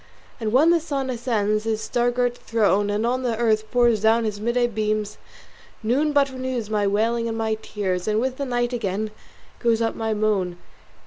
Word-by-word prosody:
And 220 -2 -2
when 295 +8 +5
the 340 - +4
sun 275 -5 -3
ascends 215 -4 0
his 220 -1 0
star 240 +2 0
girt 245 0 0
throne, 205 -4 +1
And 210 +2 0
on 250 +2 0
the 240 -3 -1
earth 220 -2 +1
pours 240 -4 +3
down 225 +1 +4
his 210 -2 -3
midday 240 +2 +1
beams, 215 -2 -2 0.6
Noon 275 +7 +2
but 280 -2 +3
renews 255 -4 -4
my 205 -1 +1
wailing 230 +3 +1
and 225 - -3
my 220 -1 0
tears; 185 -3 -3
And 215 0 +2
with 260 +2 -1
the 280 - -2
night 240 -1 -1
again 215 -2 -2 0.5
goes 230 -2 +2
up 230 -1 0
my 220 -1 -2
moan. 200 -5 0
225 Hz, 190 wpm, -23 LUFS, 215-245 Hz, 0.6 s, when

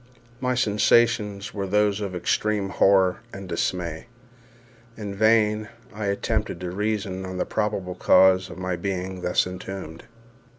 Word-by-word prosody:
My 125 -1 0
sensations 105 -3 +2
were 100 -2 -3
those 105 +1 +2
of 100 -3 -4
extreme 100 +2 0
horror 95 -2 +3
and 95 -1 -8
dismay. 85 +1 -3 0.9
In 105 -2 -5
vain 110 0 +2 0.2
I 105 0 -4
attempted 105 -1 -1
to 90 -1 -4
reason 100 -1 -2
on 95 0 -6
the - - -1
probable 105 -4 -2
cause 95 +1 +4
of - - -9
my 95 -1 -2
being 95 0 -4
thus 90 - +2
entombed. 90 -2 -7
100 Hz, 135 wpm, -24 LUFS, 95-105 Hz, 0.9 s, cause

